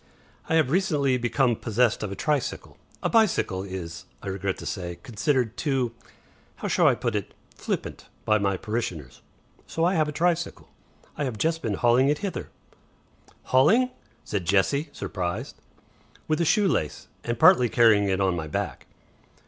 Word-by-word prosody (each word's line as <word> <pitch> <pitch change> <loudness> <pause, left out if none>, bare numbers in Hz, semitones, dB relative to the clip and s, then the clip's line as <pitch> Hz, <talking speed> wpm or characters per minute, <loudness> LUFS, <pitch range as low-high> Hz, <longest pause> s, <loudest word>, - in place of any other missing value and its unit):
"I 160 - +2
have 155 -5 +3
recently 150 -7 +2
become 120 +1 +2
possessed 115 +1 +1
of 105 - -3
a - - -4
tricycle. 145 +5 -2 0.3
A - - +2
bicycle 210 - +2
is, 95 -4 -7 0.2
I - - -4
regret 95 0 -2
to - - -9
say, 90 -3 -4
considered 125 -1 0
too 135 -6 0 0.6
how - - -5
shall - - +3
I - - +5
put 120 -2 -2
it? 105 - -4 0.2
flippant - - -4 0.2
by 110 0 +3
my 100 -2 0
parishioners. 90 - -4 0.5
So 165 - 0
I 180 - +3
have 155 -4 +2
a - - -3
tricycle. 170 +2 -1 0.5
I 145 - -1
have 125 -5 -4
just 165 +7 0
been 105 -3 -1
hauling 120 +5 +3
it 150 - +2
hither." 195 - -4 0.9
"Hauling!" 220 - +4 0.3
said 100 -4 -3
Jessie, 100 - +2
surprised. 90 -2 -4 0.7
"With 155 +2 +1
a - - +2
shoe 205 +5 +3
lace. 80 - -2 0.2
And 120 0 -2
partly 125 +1 +6
carrying 110 -3 +5
it 95 0 +1
on 95 -2 +2
my 80 -2 -4
back." 75 - -4
120 Hz, 165 wpm, -26 LUFS, 100-150 Hz, 0.9 s, partly